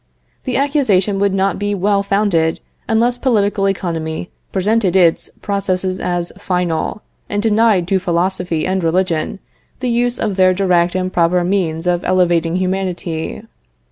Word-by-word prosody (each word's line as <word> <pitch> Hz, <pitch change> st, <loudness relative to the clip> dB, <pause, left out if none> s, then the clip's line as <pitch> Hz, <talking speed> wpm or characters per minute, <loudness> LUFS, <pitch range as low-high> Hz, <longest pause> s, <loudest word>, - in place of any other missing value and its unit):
The 255 Hz, -2 st, -1 dB
accusation 235 Hz, -9 st, +1 dB
would 200 Hz, 0 st, +2 dB
not 195 Hz, -1 st, 0 dB
be 205 Hz, 0 st, -1 dB
well 200 Hz, +1 st, +1 dB
founded 195 Hz, -5 st, +1 dB, 0.3 s
unless 240 Hz, +2 st, +1 dB
political 205 Hz, -5 st, +1 dB
economy 165 Hz, -3 st, -3 dB, 0.2 s
presented 195 Hz, -1 st, +1 dB
its 175 Hz, -3 st, +3 dB
processes 190 Hz, -2 st, -1 dB
as 175 Hz, -1 st, -2 dB
final, 180 Hz, 0 st, -2 dB, 0.3 s
and 205 Hz, -, -1 dB
denied 215 Hz, -4 st, +2 dB
to 195 Hz, -, +2 dB
philosophy 180 Hz, -2 st, -1 dB
and 185 Hz, -1 st, -1 dB
religion 165 Hz, 0 st, 0 dB, 0.4 s
the 250 Hz, -1 st, -1 dB
use 240 Hz, +1 st, +1 dB
of 205 Hz, -3 st, -2 dB
their 185 Hz, -1 st, +4 dB
direct 180 Hz, -2 st, +2 dB
and 185 Hz, 0 st, -2 dB
proper 175 Hz, +1 st, +2 dB
means 175 Hz, -3 st, -1 dB
of 175 Hz, 0 st, 0 dB
elevating 175 Hz, -2 st, +2 dB
humanity. 185 Hz, -2 st, -3 dB
185 Hz, 140 wpm, -17 LUFS, 175-205 Hz, 0.4 s, their